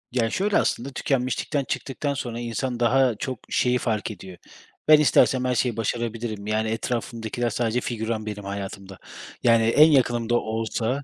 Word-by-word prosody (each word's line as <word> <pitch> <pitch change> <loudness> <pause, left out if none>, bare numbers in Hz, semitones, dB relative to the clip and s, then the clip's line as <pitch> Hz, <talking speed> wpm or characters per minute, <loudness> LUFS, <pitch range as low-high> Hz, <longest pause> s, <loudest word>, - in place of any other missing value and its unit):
Ya, 120 -2 +1
şöyle 200 - +1
aslında, 130 -1 0
tükenmişlikten 135 +2 -1
çıktıktan 140 +2 -3
sonra 120 -4 -5
insan 120 +1 -3
daha 125 0 +3
çok 130 +2 -5
şeyi 125 0 +2
fark 110 -3 -2
ediyor: 95 -2 -10 0.5
Ben 155 0 +8
istersem 130 -3 +4
her 125 0 +1
şeyi 120 -2 0
başarabilirim. 115 -2 -3
Yani 110 +1 0
etrafımdakiler 115 +1 -2
sadece 115 +1 -1
figüran 110 -2 -3
benim 105 -1 -6
hayatımda, 100 -1 -6 0.5
yani 115 -2 +5
en 150 +8 +6
yakınım 120 -4 +2
da 120 - +3
olsa 115 +4 -2
120 Hz, 150 wpm, -24 LUFS, 110-130 Hz, 0.5 s, Ben